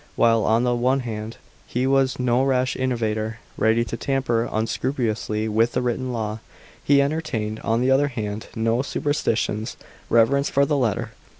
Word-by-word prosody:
While, 115 -2 +3
on 115 +2 +3
the 125 -1 +2
one 130 +3 +1
hand, 110 -2 -6 0.3
he 125 +2 -1
was 135 0 +2
no 125 0 +2
rash 130 -1 +1
innovator, 110 -3 -1 0.2
ready 115 +1 +2
to 115 - -4
tamper 120 -3 0
unscrupulously 110 -1 -1
with 115 +2 +2
the - - 0
written 125 +1 -1
law, 110 -2 -3 0.4
he 140 -1 +4
entertained, 140 -8 -2
on 115 +1 0
the 130 +1 +2
other 140 +2 +4
hand, 110 -5 -5
no 115 +2 +1
superstitious 115 -7 -1 0.3
reverence 135 +5 +3
for 140 +1 +3
the 150 - 0
letter. 120 -7 0
120 Hz, 160 wpm, -23 LUFS, 110-130 Hz, 0.4 s, he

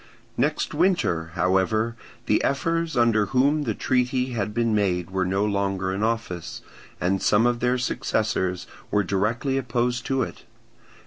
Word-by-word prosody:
Next - - 0
winter, 85 - +1
however, 95 +6 +1 0.3
the 105 - +2
ephors 165 +1 0
under 115 -4 +3
whom 140 +5 +2
the 110 -4 -1
treaty 125 +2 0
had 105 -3 -2
been 115 +1 0
made 95 -4 0
were 95 -1 0
no 95 +2 +1
longer 100 -2 -1
in 95 - -3
office, 110 -6 -3 0.4
and 95 +1 0
some 105 +3 +3
of 120 -1 +1
their 125 +1 +1
successors 105 -6 -1 0.2
were 105 0 +2
directly 110 +8 0
opposed 120 0 -1
to 135 -1 +1
it. - - -7
110 Hz, 145 wpm, -24 LUFS, 95-125 Hz, 0.4 s, under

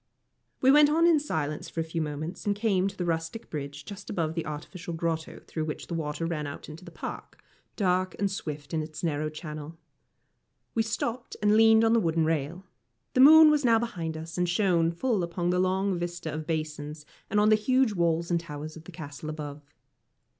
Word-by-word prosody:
We 265 - +6
went 295 +1 +7
on 325 +3 +3
in 335 -3 +5
silence 155 - -3
for - - -6
a - - +2
few 160 +1 -3
moments, 155 +6 -5
and 205 - +2
came 200 -3 +1
to 200 0 -6
the 180 - -2
rustic 165 +6 -3
bridge 145 -1 -6
just 200 -1 -9
above 160 -4 -1
the 165 -2 -3
artificial 165 +3 -6
grotto 160 -1 -3
through 155 -1 -3
which 155 - -5
the - - -6
water 160 0 -2
ran 155 -3 -2
out 140 - -8
into 155 +3 -10
the - - -10
park, - - -8 0.4
dark 185 -2 +1
and 200 -1 0
swift 150 -6 -6
in 160 - +1
its 155 0 -8
narrow 155 -2 0
channel. 155 0 -8 1.0
We 225 - +2
stopped, 225 +2 -3
and 210 +1 +3
leaned 225 0 +6
on 225 0 +4
the 230 - +5
wooden 165 -4 +1
rail. 160 +4 -2 0.5
The 255 - +4
moon 310 +2 +9
was 300 -1 +2
now 230 -2 +5
behind 170 -9 -3
us, 165 +2 -6
and 180 -1 +1
shone 175 -3 +2
full 215 +3 0
upon 175 0 -1
the 180 - +1
long 190 +1 +1
vista 175 -3 -4
of 155 0 -5
basins 150 -2 -4 0.2
and 210 - +2
on 210 +1 +5
the 215 - +7
huge 255 +2 +2
walls 170 -1 +1
and 170 - +3
towers 155 -1 -7
of 160 0 -12
the 180 - -10
Castle 155 -2 -8
above. 150 -1 -6
170 Hz, 205 wpm, -28 LUFS, 155-205 Hz, 1.0 s, moon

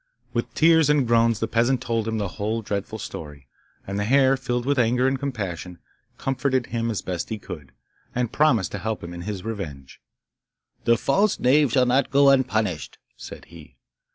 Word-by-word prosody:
With - - -2
tears 160 -2 +5
and 150 -3 +3
groans 115 -2 +3
the 115 - -1
peasant 120 +3 +2
told 115 -3 -2
him 110 0 -1
the 105 -2 -1
whole 110 +4 -3
dreadful 100 +1 -3
story, 75 -9 -8 0.4
and 100 +1 -3
the - - 0
hare, 135 +4 +4
filled 125 -2 -2
with 140 0 +1
anger 125 +2 +3
and 135 0 0
compassion, 95 -10 -4 0.4
comforted 130 -1 0
him 115 0 -2
as 110 - -3
best 90 -2 -4
he 110 - -3
could, 75 -10 -9 0.4
and 125 -2 -1
promised 130 - +2
to - - -4
help 110 -3 -3
him 85 +1 -7
in 85 - -7
his 100 0 -5
revenge. 75 -12 -7 0.8
'The 115 0 +4
false 195 - +1
knave 140 +1 +4
shall 130 -2 +4
not 125 +2 +2
go 140 0 +5
unpunished,' 110 - 0 0.2
said - - -10
he. 85 -3 -15
115 Hz, 180 wpm, -24 LUFS, 100-130 Hz, 0.8 s, tears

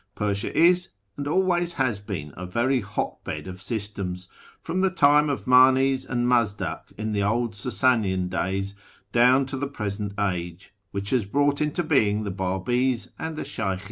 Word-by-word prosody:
Persia 100 -1 -2
is, 175 +2 +4 0.3
and 145 0 -4
always 175 +1 +1
has 125 -6 0
been, 90 -8 -6
a 90 +1 -6
very 120 +7 +1
hot 100 0 -4
bed - - -5
of 95 0 -8
systems, 100 -4 -4 0.3
from 180 +3 -2
the 190 - +3
time 150 -4 +4
of 140 - -3
Manes 130 +1 +5
and 120 -1 0
Mazdak 115 -5 0
in 110 +1 -3
the 100 - 0
old 115 +3 0
Sasanian 105 -5 +1
days, 95 +2 -2 0.4
down 125 +3 +5
to 135 0 -5
the 140 +2 -2
present 105 -5 -4
age, 90 -2 -3 0.2
which 100 0 -4
has 125 -4 +2
brought 145 +8 +1
into 150 +3 0
being 110 -9 +2
the 100 - -3
Babi's 110 +7 -1
and 160 0 -4
the - - -4
Sheykhis. 95 -1 -2
115 Hz, 170 wpm, -25 LUFS, 100-135 Hz, 0.4 s, Manes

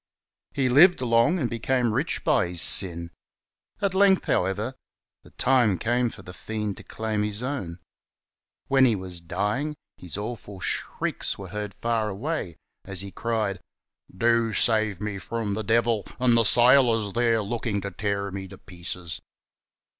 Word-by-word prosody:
He 135 -2 +1
Kved 165 +9 +6
long 115 +10 +3
and 135 -8 0
became 120 0 0
rich 140 +8 -1
by 145 - +2
his 85 -1 -3
sin. 85 -3 +3 0.7
At 195 -2 +1
length, 190 0 +4
however, 105 +7 0 0.5
the - - -17
time 125 -7 +2
came 120 +5 +1
for 95 - -12
the 90 - -9
fiend 105 0 -4
to - - -11
claim 110 -1 -3
his 105 +2 -2
own. 125 -12 -4 0.9
When 135 -1 +3
he 115 -4 +3
was 90 -3 -4
dying 105 - -2 0.2
his 90 0 -8
awful 105 -2 -6
shrieks - - -2
were 95 -2 -8
heard 105 0 -5
far 115 -2 -1
away, 105 - -4 0.3
as 95 -1 -2
he 100 0 -7
cried, 110 -4 -2 0.3
" 95 - -24
Do 115 -1 +2
save 110 -2 +1
me 105 -2 -3
from 110 -1 -3
the 110 +2 -3
devil, 115 -1 +1
and 125 -2 +4
the 115 -1 +4
sailors, 120 -3 +4
there, 115 -2 +2
looking 110 -1 -2
to 100 +1 -5
tear 100 +1 -2
me 95 0 -6
to - - -12
pieces." 85 -3 -7
110 Hz, 160 wpm, -25 LUFS, 100-120 Hz, 0.9 s, Kved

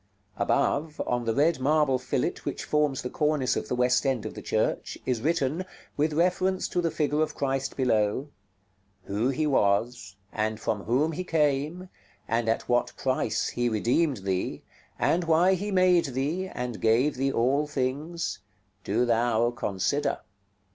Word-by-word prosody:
Above, 150 +1 0
on 120 -1 -1
the 115 - +1
red 155 +1 +3
marble 145 -1 +2
fillet 130 - -1
which - - -4
forms 150 -3 0
the 125 - -3
cornice 150 -4 +1
of - - -3
the - - -1
west 125 +1 +2
end 135 -5 0
of - - -5
the - - -8
church, - - -1
is 125 -3 -1
written, 155 +2 0 0.3
with 150 +2 +1
reference 185 +3 +1
to 175 - -1
the 170 - +1
figure 150 -1 0
of 155 - -1
Christ 135 -1 -2
below: 120 +1 +1 0.8
"WHO 105 +6 0
HE 145 +3 0
WAS, 110 -5 +1 0.2
AND 110 0 -1
FROM 105 -2 -2
WHOM 135 +8 +2
HE 180 +4 -4
CAME, 155 +3 0 0.4
AND 115 0 0
AT 115 - -1
WHAT 120 0 +1
PRICE 130 -4 0
HE 120 0 0
REDEEMED 125 +6 +1
THEE, 95 -1 -2 0.3
AND 175 +1 +1
WHY 165 +3 +4
HE 200 +3 -2
MADE 185 -3 +4
THEE, 145 +8 -2
AND 125 -9 -5
GAVE 120 +6 +3
THEE 135 +1 +1
ALL 135 +5 +1
THINGS, 150 +4 -3 0.4
DO 110 +6 +1
THOU 120 0 +2
CONSIDER." 120 +3 -1
135 Hz, 160 wpm, -27 LUFS, 120-155 Hz, 0.8 s, WHY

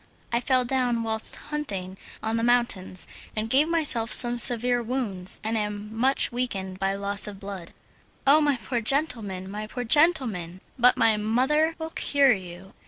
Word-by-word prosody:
"I 235 - +2
fell 255 0 +1
down 245 -2 -1
whilst 220 0 -2
hunting 200 -12 -6 0.3
on 220 +1 -2
the 230 - -1
mountains, 235 -7 -1 0.3
and 220 +1 -4
gave 290 +4 +3
myself 275 -10 +3
some 240 -1 +7
severe 245 +1 +3
wounds, 220 -7 -3
and 220 +1 -2
am 210 0 -5
much 260 +4 +1
weakened 195 -7 -4
by 195 0 -1
loss 200 0 +2
of 200 -2 -9
blood." 195 -4 -9 0.5
"Oh! 290 +3 +5
my 290 -3 +1
poor 240 +1 -4
gentleman, 225 -8 -2
my 210 +2 -7
poor 245 +3 -6
gentleman! 230 - +1 0.2
But 250 +1 +4
my 220 -1 +3
mother 265 +9 0
will 320 -1 -7
cure 280 -5 +2
you." 185 -1 -10
230 Hz, 165 wpm, -24 LUFS, 200-260 Hz, 0.5 s, some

